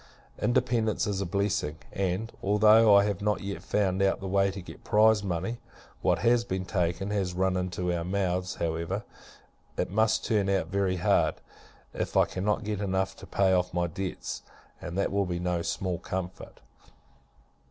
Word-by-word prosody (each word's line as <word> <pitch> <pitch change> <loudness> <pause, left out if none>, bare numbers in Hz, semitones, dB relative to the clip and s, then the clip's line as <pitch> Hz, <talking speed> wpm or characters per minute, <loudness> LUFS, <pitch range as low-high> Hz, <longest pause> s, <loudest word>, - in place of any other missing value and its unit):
Independence 115 -2 +1
is 100 -2 -1
a 95 - -2
blessing; 95 -5 -1
and, 95 +4 -2
although 105 +1 +6
I 100 - +7
have 100 -2 -2
not 105 0 0
yet 100 0 -5
found 95 -2 0
out 95 0 +2
the 95 - -5
way 100 +1 +2
to 95 +1 -6
get 90 - -11
prize 110 0 +4
money 95 +5 -2 0.4
what - - +2
has 120 0 +4
been 95 -4 -3
taken, 90 +2 -1
has 95 -4 -1
run 95 0 +1
into 90 -1 -1
our 85 -1 -2
mouths 90 0 -1
however, 80 0 -2 0.7
it - - -1
must 110 +2 +2
turn 105 -3 +1
out 95 -4 0
very 95 -1 0
hard, 90 - +2 0.6
if - - -2
I - - +6
cannot 105 +4 -1
get 105 -1 -3
enough 95 -1 -1
to - - -11
pay 95 -1 +2
off 90 -1 0
my 90 0 +2
debts, 90 +3 -5 0.4
and 85 +1 -5
that 100 - +1
will 100 -1 +1
be 90 -1 -2
no 90 -1 -1
small 90 -1 -2
comfort. 95 +1 -6
95 Hz, 175 wpm, -28 LUFS, 90-105 Hz, 0.7 s, I